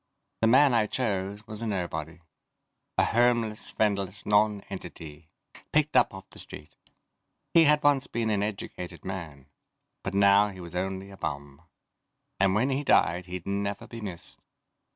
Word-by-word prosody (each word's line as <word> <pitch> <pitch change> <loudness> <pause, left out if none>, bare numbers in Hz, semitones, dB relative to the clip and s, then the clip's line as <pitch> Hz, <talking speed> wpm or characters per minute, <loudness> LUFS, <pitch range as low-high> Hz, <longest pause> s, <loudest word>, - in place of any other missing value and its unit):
The 110 - +4
man 130 +3 +6
I 110 -2 +3
chose 100 -3 -2
was 110 0 -7
a 115 - -2
nobody. 85 -4 -4 0.8
A - - +5
homeless, 120 -2 +1
friendless 100 -2 -1
non 105 0 +3
entity, 80 -5 -9 0.4
picked 155 0 +2
up - - +5
off 95 0 -10
the - - -11
street. 75 - -10 0.8
He 165 -1 +7
had 150 0 +4
once 145 -2 +3
been 115 -2 -1
an 100 -1 +1
educated 95 -4 -5
man. 80 -8 -6 0.6
But 95 - -4
now 100 +1 +6
he 95 -2 -9
was 85 -1 -9
only 95 +1 -3
a 95 - -12
bum, 70 -1 -5 0.8
and 95 0 +3
when 125 +6 +2
he 135 +2 -1
died 90 - +3
he'd 90 -1 -6
never 100 0 -2
be 115 -1 -9
missed. 95 -5 -8
100 Hz, 155 wpm, -28 LUFS, 90-110 Hz, 0.8 s, He